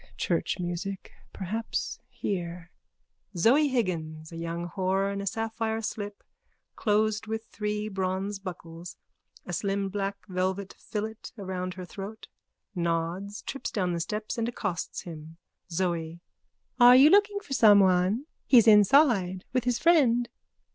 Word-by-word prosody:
Church -, -, 0 dB
music. 180 Hz, +2 st, -4 dB, 0.2 s
Perhaps 220 Hz, +4 st, -3 dB
here. 175 Hz, -3 st, -4 dB, 0.6 s
_(Zoe 265 Hz, -, +4 dB
Higgins, 160 Hz, -10 st, -2 dB
a -, -, -8 dB
young 170 Hz, +1 st, -4 dB
whore 190 Hz, +2 st, 0 dB
in 200 Hz, -, -3 dB
a 200 Hz, -, -5 dB
sapphire 225 Hz, +1 st, -2 dB
slip, 205 Hz, -1 st, -5 dB, 0.5 s
closed 215 Hz, 0 st, +1 dB
with 220 Hz, +1 st, -4 dB
three 210 Hz, 0 st, -2 dB
bronze 190 Hz, 0 st, -2 dB
buckles, 170 Hz, -2 st, -8 dB, 0.5 s
a 180 Hz, -, -6 dB
slim 195 Hz, +2 st, -1 dB
black 200 Hz, 0 st, -2 dB
velvet 190 Hz, +1 st, -2 dB
fillet 215 Hz, +1 st, -4 dB, 0.2 s
round 185 Hz, -2 st, -4 dB
her 185 Hz, -1 st, -7 dB
throat, 200 Hz, +4 st, -8 dB, 0.5 s
nods, 170 Hz, +3 st, -2 dB
trips 275 Hz, -, -4 dB
down 180 Hz, -4 st, -1 dB
the 170 Hz, -, -2 dB
steps 210 Hz, +7 st, -3 dB
and 230 Hz, +1 st, 0 dB
accosts 205 Hz, -7 st, -4 dB
him.)_ 160 Hz, -2 st, -9 dB, 0.4 s
ZOE: 170 Hz, -1 st, -2 dB, 0.6 s
Are 245 Hz, +1 st, +9 dB
you 280 Hz, +4 st, +8 dB
looking 410 Hz, 0 st, +4 dB
for 345 Hz, -9 st, -7 dB
someone? 200 Hz, 0 st, +5 dB, 0.2 s
He's 240 Hz, -5 st, +7 dB
inside 210 Hz, -, +5 dB
with 255 Hz, -2 st, 0 dB
his 245 Hz, -1 st, +1 dB
friend. 245 Hz, -7 st, +4 dB
200 Hz, 130 wpm, -28 LUFS, 180-220 Hz, 0.6 s, Are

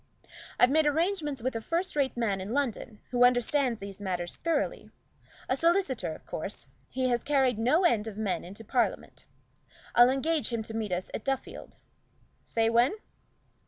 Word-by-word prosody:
I've 245 Hz, -, +6 dB
made 310 Hz, +1 st, +4 dB
arrangements 300 Hz, -, 0 dB
with 260 Hz, -1 st, -1 dB
a 225 Hz, -, -2 dB
first 340 Hz, +9 st, -2 dB
rate 275 Hz, -4 st, 0 dB
man 205 Hz, -5 st, 0 dB
in 200 Hz, +5 st, -5 dB
London, 245 Hz, -5 st, -2 dB
who 245 Hz, -1 st, +3 dB
understands 245 Hz, 0 st, +3 dB
these 200 Hz, 0 st, -8 dB
matters 180 Hz, -3 st, -3 dB
thoroughly 335 Hz, +10 st, -2 dB, 0.6 s
a 260 Hz, -, +1 dB
solicitor, 325 Hz, -, +1 dB
of -, -, -16 dB
course 195 Hz, +6 st, -6 dB, 0.2 s
he 255 Hz, 0 st, -1 dB
has 240 Hz, -1 st, 0 dB
carried 265 Hz, -5 st, +2 dB
no 295 Hz, +11 st, +3 dB
end 230 Hz, -11 st, +2 dB
of 215 Hz, -2 st, -7 dB
men 210 Hz, -4 st, -1 dB
into 200 Hz, +5 st, -9 dB
Parliament. 245 Hz, +3 st, -1 dB, 0.7 s
I'll 240 Hz, +1 st, +7 dB
engage 295 Hz, +4 st, 0 dB
him 230 Hz, -2 st, -2 dB
to 220 Hz, -, -8 dB
meet 220 Hz, -3 st, -3 dB
us 180 Hz, +1 st, -3 dB
at -, -, -4 dB
Duffield 270 Hz, -1 st, -4 dB, 0.7 s
say 225 Hz, -1 st, 0 dB
when?" 235 Hz, -, +3 dB
245 Hz, 165 wpm, -29 LUFS, 220-285 Hz, 0.7 s, I'll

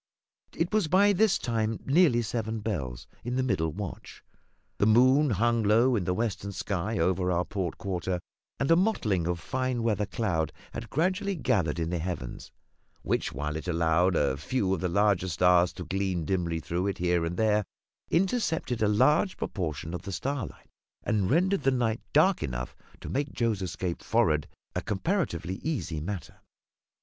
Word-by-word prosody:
It 170 Hz, +5 st, -1 dB
was 215 Hz, -6 st, +2 dB
by 200 Hz, +5 st, +5 dB
this 215 Hz, +1 st, +3 dB
time 110 Hz, -2 st, -1 dB
nearly 140 Hz, -5 st, +4 dB
seven 110 Hz, 0 st, -3 dB
bells 65 Hz, -, -4 dB, 0.2 s
in 120 Hz, +2 st, -3 dB
the 130 Hz, -, +1 dB
middle 90 Hz, -10 st, 0 dB
watch; 100 Hz, +2 st, -7 dB, 0.6 s
the 100 Hz, -, +4 dB
moon 130 Hz, +6 st, +5 dB
hung 115 Hz, +2 st, +2 dB
low 115 Hz, +4 st, +4 dB
in 100 Hz, -6 st, -1 dB
the 90 Hz, -, +1 dB
western 105 Hz, -2 st, -2 dB
sky 100 Hz, +2 st, -2 dB
over 90 Hz, +1 st, +1 dB
our 90 Hz, 0 st, +1 dB
port 95 Hz, -5 st, -3 dB
quarter, 90 Hz, -2 st, -2 dB, 0.4 s
and 140 Hz, +3 st, +1 dB
a -, -, +8 dB
mottling 110 Hz, -, +1 dB
of 90 Hz, -1 st, -1 dB
fine 130 Hz, +1 st, -2 dB
weather 105 Hz, -3 st, +1 dB
cloud 85 Hz, -9 st, -1 dB, 0.2 s
had 115 Hz, -1 st, -6 dB
gradually 190 Hz, -, 0 dB
gathered 90 Hz, -, 0 dB
in 85 Hz, 0 st, -2 dB
the 90 Hz, -, -1 dB
heavens, 80 Hz, -8 st, -5 dB, 0.5 s
which, -, -, 0 dB
while 75 Hz, +3 st, -3 dB
it 80 Hz, -, -5 dB
allowed 85 Hz, +1 st, +2 dB
a 70 Hz, -3 st, +1 dB
few 95 Hz, -, 0 dB
of 95 Hz, -, -1 dB
the 90 Hz, -, 0 dB
larger 100 Hz, 0 st, +2 dB
stars 90 Hz, +1 st, +4 dB
to 90 Hz, -, -7 dB
gleam 95 Hz, -4 st, -1 dB
dimly 85 Hz, -2 st, -1 dB
through 85 Hz, +4 st, -2 dB
it 100 Hz, -, -2 dB
here 90 Hz, -1 st, +1 dB
and 85 Hz, +2 st, -3 dB
there, 105 Hz, 0 st, +3 dB, 0.5 s
intercepted 170 Hz, -, 0 dB
a 105 Hz, -, +4 dB
large 140 Hz, -, +3 dB
proportion 80 Hz, -2 st, -4 dB
of 90 Hz, -, -4 dB
the 100 Hz, -, -7 dB
starlight, 135 Hz, +6 st, -4 dB, 0.3 s
and 100 Hz, -4 st, +1 dB
rendered 185 Hz, +6 st, +2 dB
the -, -, +3 dB
night 120 Hz, -4 st, 0 dB
dark 180 Hz, +5 st, +4 dB
enough -, -, -4 dB, 0.3 s
to -, -, -8 dB
make 140 Hz, +1 st, -2 dB
Joe's 115 Hz, -5 st, 0 dB
escape 90 Hz, -1 st, -3 dB
forward 75 Hz, -1 st, +2 dB, 0.3 s
a -, -, -1 dB
comparatively 95 Hz, -, -1 dB
easy 135 Hz, -, -2 dB
matter. 95 Hz, +2 st, -6 dB
105 Hz, 170 wpm, -28 LUFS, 90-130 Hz, 0.6 s, a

